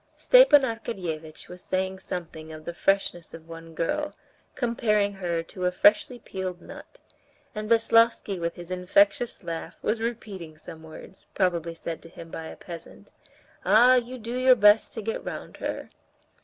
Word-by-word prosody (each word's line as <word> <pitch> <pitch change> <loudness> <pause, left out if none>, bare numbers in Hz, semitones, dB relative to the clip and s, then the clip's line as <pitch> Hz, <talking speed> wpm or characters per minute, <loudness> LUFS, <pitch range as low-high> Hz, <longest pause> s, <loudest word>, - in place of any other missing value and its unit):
Stepan - - +7
Arkadyevitch 180 -10 -5
was 180 0 -11
saying 190 0 -2
something 160 -4 -7
of 155 0 -10
the 170 - -5
freshness 185 -3 0
of 165 0 -13
one 165 0 -11
girl, 295 - -2 0.4
comparing 210 -4 +1
her 175 -4 -2
to 180 +2 -6
a - - +1
freshly 210 +6 +3
peeled 190 -5 -6
nut, - - -13 0.5
and 215 -1 -5
Veslovsky 230 -3 +3
with 170 0 -2
his 175 0 -10
infectious 200 +5 +2
laugh 165 -1 -6
was 225 0 0
repeating 200 -9 -5
some 160 +1 -11
words, 160 +3 -13
probably 170 -3 0
said 165 0 -6
to 165 - -13
him 165 -1 -12
by 160 - -6
a - - -9
peasant: 170 -2 -11 0.5
"Ah, 245 +4 +6
you 250 0 0
do 235 +1 -6
your 255 0 +5
best 210 -1 +5
to 225 -4 -6
get 225 +2 -3
round - - -7
her!" - - -5
190 Hz, 160 wpm, -26 LUFS, 165-230 Hz, 0.5 s, Stepan